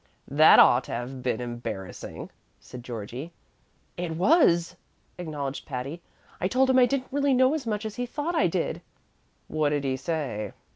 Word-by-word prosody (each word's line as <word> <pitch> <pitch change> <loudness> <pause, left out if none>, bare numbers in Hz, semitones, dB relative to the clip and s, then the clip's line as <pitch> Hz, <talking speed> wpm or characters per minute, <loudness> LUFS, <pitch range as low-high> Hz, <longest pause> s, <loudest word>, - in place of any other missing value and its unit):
"That 155 +3 +7
ought 125 +2 +6
to - - -7
have 125 +2 -5
been 125 -3 -1
embarrassing," 115 -6 -6 0.3
said 125 -1 -11
Georgie. 120 +7 -7 0.6
"It 175 -2 -3
was," 180 - +4 0.4
acknowledged 145 -5 -5
Patty. 135 +5 -5 0.4
"I 185 - +2
told 260 +5 +3
him 260 - +5
I 250 - +6
didn't 265 0 -2
really 280 -1 +2
know 260 +2 +4
as 295 -6 -3
much 210 0 -2
as 215 +1 -6
he 245 0 -2
thought 295 +7 -3
I 325 - +3
did." - - -2 0.7
"What 155 -1 0
did 145 -1 -1
he 135 -1 0
say?" 130 - -3
155 Hz, 165 wpm, -26 LUFS, -, 0.7 s, That